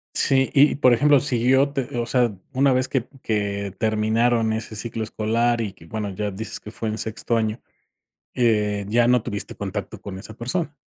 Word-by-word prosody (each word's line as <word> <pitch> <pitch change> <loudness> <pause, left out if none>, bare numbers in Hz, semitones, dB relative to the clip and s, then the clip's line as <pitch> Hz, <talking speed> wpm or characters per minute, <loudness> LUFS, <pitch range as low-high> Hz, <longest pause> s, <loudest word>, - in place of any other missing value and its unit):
Sí, 135 -1 +4
y 145 +2 +5
por 130 -3 +4
ejemplo, 145 +3 +5
si 125 -3 +1
yo 135 +2 +4
te, 135 -3 -4
o 120 - -1
sea, 120 -2 +2 0.2
una 135 0 +3
vez 130 +1 +1
que 130 -3 -2
que 100 -2 -2
terminaron 110 +1 +1
ese 110 0 -4
ciclo 110 +1 -3
escolar, 115 +2 0
y 100 -4 -4
que 80 - -17
bueno 105 +3 -4
ya 100 +2 -3
dices 110 +4 -4
que 105 - -10
fue 115 0 -4
en 110 - -3
sexto 115 +1 -1
año, 110 0 -1 0.7
eh, 105 -4 +1
¿ya 120 +2 +3
no 125 -1 +3
tuviste 105 -3 -4
contacto 100 0 -5
con 95 -2 -7
esa 110 +2 -10
persona? 145 - -2
115 Hz, 195 wpm, -23 LUFS, 105-125 Hz, 0.7 s, y